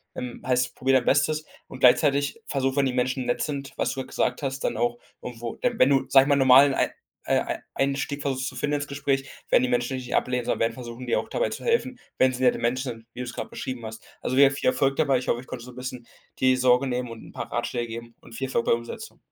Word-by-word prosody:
Ähm, 125 Hz, -1 st, -6 dB
heißt 125 Hz, -1 st, +1 dB
probiere 130 Hz, 0 st, +3 dB
dein 120 Hz, -, -9 dB
Bestes. 155 Hz, +2 st, +2 dB, 0.2 s
Und 130 Hz, -, -10 dB
gleichzeitig 140 Hz, -, +4 dB
versuche, 135 Hz, -1 st, -1 dB
wenn 140 Hz, -1 st, +3 dB
die 130 Hz, -, 0 dB
Menschen 130 Hz, +1 st, 0 dB
nett 120 Hz, -, 0 dB
sind, 140 Hz, -2 st, -4 dB
was -, -, 0 dB
du 130 Hz, -1 st, -4 dB
gesagt 130 Hz, +1 st, -1 dB
hast, 135 Hz, -1 st, -2 dB
dann -, -, -1 dB
auch 120 Hz, +1 st, 0 dB, 0.2 s
irgendwo 120 Hz, -1 st, -6 dB
äh, 245 Hz, -, +2 dB
wenn 130 Hz, -, +4 dB
du, 135 Hz, -1 st, +3 dB
sage 135 Hz, +1 st, +6 dB
mal 140 Hz, -, +5 dB
normalen 135 Hz, +1 st, +6 dB
ei -, -, +1 dB, 0.4 s
äh, -, -, +3 dB
ei -, -, -3 dB
Einstieg 140 Hz, +1 st, -1 dB
versuchst 130 Hz, -2 st, -1 dB
zu -, -, -6 dB
finden 150 Hz, 0 st, -1 dB
ins 145 Hz, 0 st, -3 dB
Gespräch, 140 Hz, -1 st, -1 dB, 0.2 s
werden -, -, +5 dB
die 125 Hz, -, +1 dB
Menschen 125 Hz, +1 st, 0 dB
nicht 125 Hz, -1 st, -6 dB
ablehnen, 125 Hz, -1 st, 0 dB
sondern -, -, -1 dB
werden 115 Hz, 0 st, +1 dB
versuchen, 120 Hz, +1 st, -8 dB
dir 120 Hz, -, +2 dB
auch -, -, -5 dB
dabei -, -, 0 dB
zu -, -, -7 dB
helfen, 465 Hz, -, +1 dB, 0.2 s
wenn 130 Hz, 0 st, +5 dB
sie 130 Hz, 0 st, -4 dB
nette 125 Hz, -, +3 dB
Menschen 125 Hz, +2 st, -1 dB
sind, 115 Hz, -1 st, -12 dB
wie 125 Hz, -, -10 dB
du -, -, -2 dB
es 125 Hz, -1 st, -6 dB
gerade -, -, -5 dB
beschrieben 130 Hz, -2 st, -6 dB
hast. 110 Hz, 0 st, -8 dB, 0.2 s
Also, 130 Hz, -, -2 dB
wir 140 Hz, 0 st, +7 dB
viel 135 Hz, -, -2 dB
Erfolg 135 Hz, +1 st, +1 dB
dabei. 140 Hz, -4 st, +3 dB
Ich 125 Hz, -, -5 dB
hoffe, 120 Hz, -, 0 dB
ich 130 Hz, -, -16 dB
konnte 120 Hz, -2 st, -7 dB
so 125 Hz, -, -10 dB
'n -, -, -17 dB
bisschen 125 Hz, -1 st, -6 dB, 0.3 s
die 130 Hz, 0 st, +4 dB
Sorge 125 Hz, +1 st, +3 dB
nehmen 125 Hz, -1 st, -2 dB
und 115 Hz, -1 st, -9 dB
'n -, -, -13 dB
paar -, -, -7 dB
Ratschläge 120 Hz, -1 st, -2 dB
geben 115 Hz, +1 st, -8 dB
und 115 Hz, -, -13 dB
viel 135 Hz, -, -2 dB
Erfolg 130 Hz, -3 st, -1 dB
bei -, -, +5 dB
Umsetzung. 115 Hz, 0 st, -6 dB
130 Hz, 260 wpm, -25 LUFS, 125-135 Hz, 0.4 s, wir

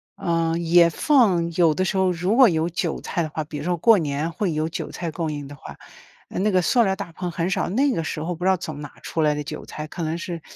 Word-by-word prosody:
呃， 165 Hz, -1 st, 0 dB
也 170 Hz, 0 st, +5 dB
放 190 Hz, -, +3 dB
有 165 Hz, -2 st, +4 dB
的 185 Hz, +4 st, 0 dB
时 190 Hz, -, -1 dB
候 190 Hz, -1 st, +2 dB
如 180 Hz, +5 st, 0 dB
果 255 Hz, -5 st, +7 dB
有 160 Hz, 0 st, 0 dB
韭 175 Hz, -1 st, -2 dB
菜 170 Hz, -, -2 dB
的 155 Hz, -, -4 dB
话， 155 Hz, +1 st, -4 dB
比 150 Hz, -1 st, -7 dB
如 145 Hz, -, -5 dB
说 175 Hz, 0 st, 0 dB
过 225 Hz, +6 st, +5 dB
年 150 Hz, +1 st, -2 dB
会 185 Hz, +1 st, -1 dB
有 155 Hz, 0 st, -1 dB
韭 165 Hz, -, -5 dB
菜 170 Hz, -2 st, -4 dB
供 160 Hz, -1 st, -3 dB
应 145 Hz, -1 st, -6 dB
的 145 Hz, -, -10 dB
话， -, -, -11 dB, 0.5 s
啊， -, -, -7 dB
那 210 Hz, +3 st, +2 dB
个 185 Hz, -1 st, +3 dB
塑 235 Hz, +8 st, +3 dB
料 195 Hz, -3 st, +1 dB
大 190 Hz, -5 st, -7 dB
棚 180 Hz, 0 st, -4 dB
很 175 Hz, +1 st, -2 dB
少， -, -, -1 dB
那 270 Hz, +8 st, +2 dB
个 165 Hz, -, -1 dB
时 155 Hz, -, -4 dB
候 170 Hz, +2 st, -3 dB
不 175 Hz, -, -8 dB
知 190 Hz, -, +3 dB
道 190 Hz, -, +3 dB
从 155 Hz, -4 st, -7 dB
哪 145 Hz, -, -7 dB
儿 -, -, -22 dB
出 165 Hz, -, -3 dB
来 150 Hz, -1 st, +3 dB
的 150 Hz, 0 st, -4 dB
韭 150 Hz, +1 st, -7 dB
菜， 150 Hz, 0 st, -7 dB
可 170 Hz, +2 st, -6 dB
能 160 Hz, +2 st, -2 dB
是 170 Hz, -2 st, -6 dB
170 Hz, 305 characters per minute, -23 LUFS, 155-185 Hz, 0.5 s, 果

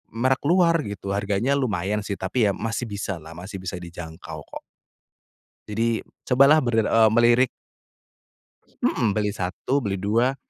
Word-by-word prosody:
merek 130 Hz, +3 st, +2 dB
luar 170 Hz, -1 st, +4 dB
gitu, 100 Hz, -1 st, -5 dB
harganya 100 Hz, +5 st, 0 dB
lumayan 105 Hz, -5 st, -1 dB
sih 100 Hz, -, -3 dB
tapi 105 Hz, +4 st, +1 dB
ya -, -, 0 dB
masih 115 Hz, +2 st, -3 dB
bisalah 95 Hz, -6 st, -5 dB
masih 95 Hz, +2 st, -7 dB
bisa 95 Hz, 0 st, -4 dB
dijangkau 85 Hz, -2 st, -8 dB
kok. -, -, -9 dB, 1.1 s
Jadi 115 Hz, +2 st, 0 dB, 0.2 s
cobalah 140 Hz, +4 st, +6 dB
ber 120 Hz, -5 st, -1 dB
e 115 Hz, -, +2 dB
melirik. 120 Hz, +2 st, +4 dB, 1.4 s
Mhm, 115 Hz, -4 st, +2 dB
beli 105 Hz, -1 st, 0 dB
1, 95 Hz, +8 st, -1 dB
beli 100 Hz, -3 st, -1 dB
2. 115 Hz, +7 st, +1 dB
105 Hz, 135 wpm, -24 LUFS, 95-125 Hz, 1.4 s, cobalah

